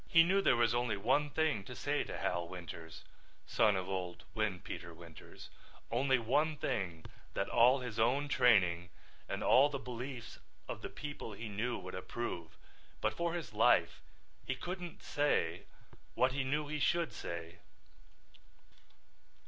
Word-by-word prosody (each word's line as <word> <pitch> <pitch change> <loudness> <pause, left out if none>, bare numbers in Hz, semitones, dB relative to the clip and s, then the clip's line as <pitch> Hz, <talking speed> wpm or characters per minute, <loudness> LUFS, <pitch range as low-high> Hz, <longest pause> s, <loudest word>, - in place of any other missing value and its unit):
He 165 -3 +7
knew 190 +4 +3
there - - +4
was 120 0 +3
only 120 -3 0
one 135 +8 +2
thing 145 -7 +1
to - - -8
say - - 0
to - - -5
Hal 85 -1 -1
Winters, 85 -3 -8 0.4
son 105 -2 +3
of 95 -1 -2
old 90 -2 -4
Windpeter 95 -5 -3
Winters, 85 -1 -12 0.4
only 130 +3 +3
one 145 +7 +1
thing 85 - -2 0.3
that 100 - 0
all 125 +5 +5
his 120 -3 -5
own 130 +6 +3
training 90 -10 +4 0.4
and - - -2
all 140 +3 +6
the 140 - -3
beliefs 125 -1 -7 0.3
of - - -5
the - - -5
people 145 -6 -6
he 110 +2 -6
knew 115 +4 -1
would 95 0 -8
approve, 95 -4 -5 0.4
but - - +1
for 170 0 -1
his 170 - -5
life - - +4 0.4
he 130 - -2
couldn't 175 +2 -6
say 90 - 0 0.5
what 130 +1 +3
he 135 +1 -1
knew 145 +3 -1
he 150 +1 -3
should 170 +3 +1
say. 85 0 -6
120 Hz, 150 wpm, -34 LUFS, 95-145 Hz, 0.5 s, He